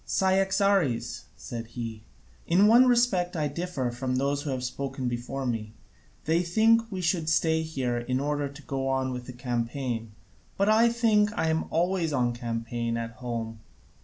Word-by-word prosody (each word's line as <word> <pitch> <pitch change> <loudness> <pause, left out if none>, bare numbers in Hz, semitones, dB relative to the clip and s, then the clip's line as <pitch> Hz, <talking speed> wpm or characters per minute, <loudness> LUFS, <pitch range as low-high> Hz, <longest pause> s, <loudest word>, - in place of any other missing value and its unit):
"Cyaxares," 195 - +1
said 115 -1 -6
he, 115 -2 -5 0.5
"in 185 +5 +5
one 240 +4 +7
respect 235 -8 +2
I 150 -1 +1
differ 145 -4 -3
from 130 +1 -2
those 140 +2 0
who 145 - -5
have 130 -2 -2
spoken 135 0 -3
before 125 +3 -3
me: 110 -3 -3 0.5
they 165 +2 +2
think 225 +6 +3
we 190 -1 -3
should 165 -2 0
stay 160 0 +2
here 130 -7 -2
in 125 +2 -1
order 145 0 -1
to 140 +2 -12
go 135 -1 -3
on 130 -1 0
with 125 -1 -6
the 125 - -7
campaign, 120 -2 -3 0.4
but 200 - +2
I 225 +2 +5
think 225 -3 +3
I 160 - +1
am 160 0 0
always 170 -1 0
on 120 -3 +1
campaign 115 0 -3
at 115 0 -4
home. 115 -3 -4
140 Hz, 165 wpm, -27 LUFS, 120-180 Hz, 0.5 s, one